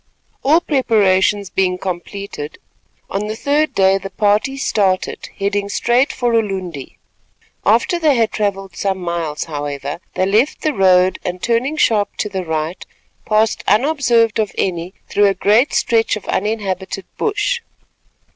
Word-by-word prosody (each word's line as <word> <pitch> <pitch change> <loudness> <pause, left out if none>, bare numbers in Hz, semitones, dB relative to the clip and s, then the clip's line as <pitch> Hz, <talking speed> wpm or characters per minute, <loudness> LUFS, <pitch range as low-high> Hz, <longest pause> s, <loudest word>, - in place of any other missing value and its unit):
All 310 +5 +4
preparations 205 - +2
being 185 -1 +1
completed, 180 -3 -6 0.5
on 200 +2 -3
the 215 - -3
third 295 +6 0
day 190 0 +4
the 195 0 -7
party 210 +7 +1
started, 195 -7 0
heading 200 0 -1
straight 240 +6 +2
for 245 -2 -1
Ulundi. 190 - -2 0.7
After 235 - +3
they 305 -4 +3
had 225 -2 +2
travelled 195 -2 -2
some 195 -1 -1
miles, 170 -4 -3
however, 145 -1 -5 0.2
they 185 - +1
left 215 +9 +1
the 310 - +1
road 185 -3 +4
and 180 0 -4
turning 240 +9 0
sharp 210 -7 +2
to 210 - -2
the 190 -2 -3
right, 160 +1 -3 0.4
passed 215 +1 +2
unobserved 235 -2 +3
of 215 -2 0
any 180 0 -2
through 205 0 +3
a 195 - +1
great 215 +8 +3
stretch 225 -1 +2
of 215 - -8
uninhabited 195 -2 -2
bush. 440 +3 0
200 Hz, 140 wpm, -18 LUFS, 185-230 Hz, 0.7 s, All